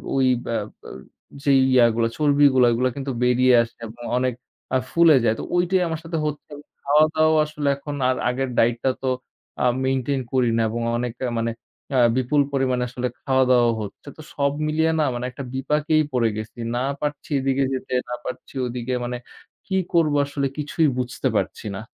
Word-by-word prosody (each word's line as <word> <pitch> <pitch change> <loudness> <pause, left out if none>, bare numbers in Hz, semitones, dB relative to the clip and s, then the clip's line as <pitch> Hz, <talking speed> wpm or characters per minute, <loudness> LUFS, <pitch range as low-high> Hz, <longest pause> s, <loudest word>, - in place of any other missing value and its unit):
ওই 135 -1 +3 0.2
বা 115 - -2 0.3
বা - - -11 0.5
যেই 140 -2 +4
ইয়া 125 -2 +6
গুলা 115 0 +1
চর্বি 145 -1 +4
গুলা 125 -2 +5
এগুলা 125 +2 +1
কিন্তু 140 -1 -4
বেরিয়ে 125 +1 +4
আসে 115 - -6
এবং 115 +2 -11 0.2
অনেক 130 0 0 0.4
আ - - +5
ফুলে 170 -2 +6
যায়। 110 -1 +2
তো - - -4
ঐটাই 180 +1 +2
আমার 160 -1 -3
সাথে 165 0 -4
হচ্ছে। 150 0 -5 0.3
খাওয়া-দাওয়াও 155 +2 +3
আসলে 150 -1 -4
এখন 145 +1 -7
আর 130 - +2
আগের 130 +1 -2
ডায়েটটা 120 +3 +2
তো 130 - +1 0.5
আ - - +3 0.2
মেইনটেইন 135 +1 0
করি 125 -2 +3
না, - - +2
এবং 115 +2 -3 0.2
অনেক 120 -1 -3 0.3
মানে 115 0 -1 0.5
আ - - +5 0.2
বিপুল 130 +3 +2
পরিমাণে 130 -2 +1
আসলে 125 +1 -3 0.2
খাওয়া-দাওয়াও 130 -3 +3
হচ্ছে। 105 +6 -9
তো - - -9
সব 140 -1 +1 0.2
মিলিয়ে 160 +1 +2
না 155 - +3
মানে 120 +1 -4
একটা 135 - -7
বিপাকেই 150 +4 +1
পড়ে 120 -3 +2
গেছি। 110 +2 -7 0.2
না 125 - 0 0.2
পারছি 150 +1 -4
এদিকে 135 0 +1
যেতে 130 0 -5 0.2
না 125 - -2
পারছি - - -7
ওদিকে, 125 +1 -4
মানে 125 0 -3 0.5
কি 190 - 0 0.2
করব 165 -3 +3
আসলে 140 -1 -2
কিছুই 150 +2 +1
বুঝতে 125 +1 -2
পারছি 110 - -2
না। 95 - -5
130 Hz, 180 wpm, -23 LUFS, 125-150 Hz, 0.5 s, ইয়া